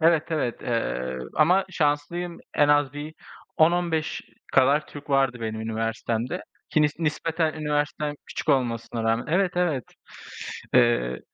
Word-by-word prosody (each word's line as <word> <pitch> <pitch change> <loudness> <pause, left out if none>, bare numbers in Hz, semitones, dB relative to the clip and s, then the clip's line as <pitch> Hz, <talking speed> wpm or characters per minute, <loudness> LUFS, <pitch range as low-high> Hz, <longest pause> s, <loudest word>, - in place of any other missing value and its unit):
Evet, 165 -1 +5
evet. 125 -7 -1
Eee, 65 - -2 0.2
ama 180 +5 +4
şanslıyım, 165 +2 -1 0.2
en 145 - +4
az 145 -2 +4
bir 150 +2 -7 0.4
10-15 165 -1 +2 0.3
kadar 140 +3 +4
Türk 145 0 -10
vardı 135 -3 +2
benim 110 -1 -3
üniversitemde 115 +6 -2 0.3
ki 155 - +3
nis 150 0 +3
nispeten 160 0 0
üniversitem 150 -1 -1
küçük - - -6
olmasına 115 -3 +1
rağmen 115 +1 +1
Evet, 180 +3 +2
evet. 160 -9 +1 0.9
Eee 120 - +3
145 Hz, 125 wpm, -25 LUFS, 120-160 Hz, 0.9 s, Evet